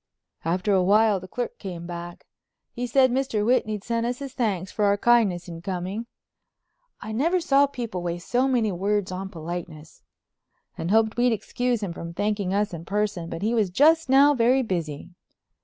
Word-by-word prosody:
After 180 +5 0
a 190 - +4
while 205 +2 +4
the 185 - -11
clerk 245 +5 -5
came 175 -4 -7
back. 175 0 -8 0.5
He 245 0 -4
said 260 +1 +4
Mr. 250 -5 0
Whitney'd 215 -4 +1
sent 230 0 -1
us 240 +1 -2
his 275 -1 -7
thanks 200 -8 -1
for 210 - 0
our 200 0 +3
kindness 205 -7 +2
in 165 -1 -8
coming—I 200 - -9
never 325 +11 +1
saw 285 -4 +3
people 235 -9 -5
waste 175 0 -4
so 250 +2 +2
many 235 -5 +1
words 200 +1 -1
on 190 +1 -5
politeness—and 165 -1 -9
hoped 220 +2 +2
we'd 245 0 +3
excuse 240 +1 -2
him 180 -4 -3
from 170 0 -8
thanking 205 -2 -1
us 205 0 0
in 165 -1 -6
person, 195 -3 -2
but 165 - -5
he 220 +3 +1
was 215 -5 +2
just 310 - +4
now 280 +2 +6
very 255 +1 +3
busy. 170 - -4
210 Hz, 175 wpm, -25 LUFS, 180-245 Hz, 0.5 s, now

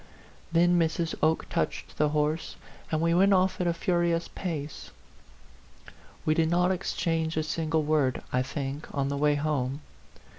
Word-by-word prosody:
Then 175 +1 +4
Mrs. 165 0 0
Oke 160 +1 +2
touched - - -3
the 150 0 +3
horse, 150 +2 -1 0.4
and 155 -1 +1
we 165 0 +2
went 195 +3 +5
off 185 0 +2
at 180 - +1
a - - +3
furious 170 -1 0
pace. 155 -5 -5 1.4
We 155 - +3
did 160 0 +2
not 180 +2 +3
exchange 165 -3 -1
a 155 - +1
single 160 0 0
word, 145 -4 +1
I 125 - +3
think, 140 +2 -4
on 140 -1 0
the 140 - -2
way 145 0 +3
home. 145 -2 -1
160 Hz, 155 wpm, -28 LUFS, 150-170 Hz, 1.4 s, went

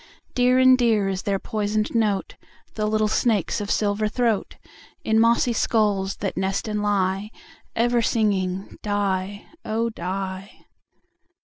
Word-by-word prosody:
Dear 250 0 +3
and 260 0 +7
dear 225 -5 +2
is 190 -1 -2
their 200 -1 0
poisoned 210 +1 -2
note, 215 -4 0 0.4
The 215 -1 -1
little 215 0 +1
snakes' 215 -2 0
of 205 - -5
silver 210 0 +1
throat, 225 -2 -1 0.5
In 220 0 +2
mossy 235 +1 +3
skulls 205 -4 +1
that 195 - -2
nest 190 +3 -1
and 210 -1 -2
lie, 200 0 0 0.5
Ever 240 +1 +2
singing 195 -5 -1
"die, 200 -1 -2 0.2
oh! 230 +2 -1
die." 190 -1 -6
210 Hz, 130 wpm, -23 LUFS, 195-225 Hz, 0.5 s, and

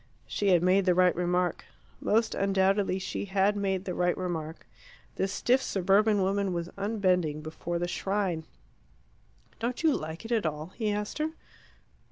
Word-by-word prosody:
She 205 - -2
had 175 -3 +4
made 185 +1 +4
the 180 -2 +3
right 180 0 +4
remark. 180 0 0 0.3
Most 225 +1 +1
undoubtedly 195 0 +2
she 190 - -4
had 195 +1 +2
made 195 -2 -1
the 180 - -3
right 175 0 +1
remark. 165 -3 -4 0.5
This 190 0 -1
stiff 250 +5 +2
suburban 200 0 +2
woman 195 0 0
was 170 0 -3
unbending 185 -7 0
before 165 +2 -4
the 175 +1 -1
shrine. 190 -3 -1 1.1
"Don't 240 +6 -3
you 310 -4 +4
like 160 +6 -6
it 225 - -7
at 220 -8 +2
all?" 155 +2 -4
he 220 -3 -1
asked 210 +6 -3
her. 310 +1 -1
190 Hz, 160 wpm, -29 LUFS, 175-205 Hz, 1.1 s, had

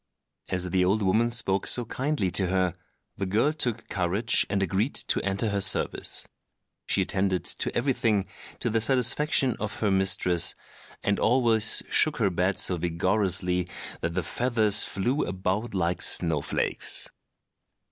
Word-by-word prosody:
As 90 -1 -1
the 95 0 +2
old 100 +4 +1
woman 110 +5 +2
spoke 110 -5 0
so 120 - +4
kindly 130 -5 -2
to 95 +1 +1
her, 95 -1 0 0.4
the 95 - -3
girl 115 +10 +1
took 120 -7 -2
courage 95 +5 0
and 100 -1 0
agreed 100 - -1
to - - -1
enter 100 +3 -1
her 100 -1 -1
service. - - 0 0.6
She - - +2
attended 95 -1 -1
to - - 0
everything 115 -6 0 0.4
to 120 - -1
the 115 0 0
satisfaction 130 +1 +1
of 105 -1 -4
her 105 -2 +1
mistress, 95 -2 +3 0.5
and 100 0 0
always 115 -3 +3
shook 155 -6 +3
her 105 -5 +1
bed 90 +2 -1
so 90 - +2
vigorously 90 +1 0 0.3
that 85 +1 -4
the 95 - -1
feathers 110 0 +1
flew 125 +9 0
about 95 +5 -3
like 90 -1 -1
snow 80 -4 +2
flakes. - - 0
100 Hz, 145 wpm, -26 LUFS, 90-115 Hz, 0.6 s, so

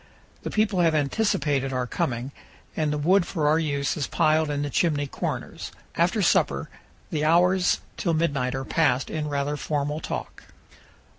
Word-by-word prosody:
The - - -4
people 210 -3 +1
have 165 -2 +3
anticipated 145 -4 +1
our 125 -1 -1
coming, 120 +1 -2 0.4
and 155 -2 0
the 150 - -1
wood 180 +6 +3
for 160 -4 -1
our 155 +2 +4
use 140 -3 -1
is 145 -5 -2
piled 155 -1 +2
in 145 0 -1
the 145 - -3
chimney 150 -3 +1
corners. 135 - -5 0.2
After - - +2
supper - - +2 0.4
the 150 -1 -1
hours 180 +3 +3 0.2
till 170 -3 0
midnight 140 -6 0
are 135 0 -4
passed 140 -5 +1
in 155 -1 -2
rather 145 0 -1
formal 150 +1 -2
talk. - - -6
150 Hz, 160 wpm, -25 LUFS, 140-165 Hz, 0.4 s, our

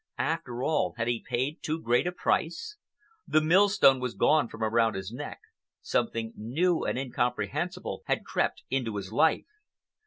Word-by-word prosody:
After 120 +1 -2
all, 155 0 +1
had 115 0 -1
he 120 -1 -1
paid 130 +5 -2
too 155 +1 -2
great 120 +3 +2
a - - 0
price? 185 - -1 0.5
The 155 - +4
millstone 165 -4 +5
was 125 -2 -3
gone 150 -4 +3
from 115 0 -7
around 115 0 +2
his 95 +1 -5
neck, 145 +5 -7 0.4
something 115 - -1
new 160 +11 0
and - - -1
incomprehensible 135 +8 -2
had - - 0
crept - - -1
into 125 -5 -1
his 100 0 -5
life. 155 +5 +3
130 Hz, 155 wpm, -28 LUFS, 115-160 Hz, 0.5 s, millstone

